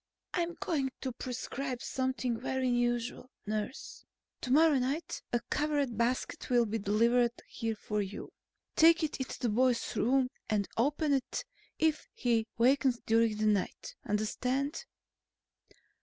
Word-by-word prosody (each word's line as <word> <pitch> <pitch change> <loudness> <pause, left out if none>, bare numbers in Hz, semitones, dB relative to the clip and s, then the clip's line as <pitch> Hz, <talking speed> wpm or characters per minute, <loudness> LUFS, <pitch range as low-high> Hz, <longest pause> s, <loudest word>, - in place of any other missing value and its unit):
"I'm 345 -1 -1
going 285 -6 -1
to 260 - -2
prescribe 255 +1 -4
something 260 -2 -1
very 260 -1 -1
unusual, 240 0 0 0.2
nurse. 215 +4 -4 0.4
Tomorrow 290 +2 +4
night 275 +6 -2
a 240 - +2
covered 290 -5 0
basket 235 +3 -1
will 240 -2 +4
be 225 +1 -2
delivered 235 +4 +3
here 225 -1 -3
for 210 0 -2
you. 200 +1 -6 0.4
Take 330 +1 +6
it 305 - -1
into 260 - -4
the 245 - 0
boy's 245 +2 +1
room 255 +1 +2 0.2
and 210 -2 +1
open 290 +5 +1
it 270 -2 -1 0.3
if 315 -1 +1
he 230 -2 +1
wakens 255 +1 +3
during 225 -1 +3
the 215 - 0
night. 205 -3 0
Understand?" 255 - -1
250 Hz, 130 wpm, -31 LUFS, 230-275 Hz, 0.4 s, Take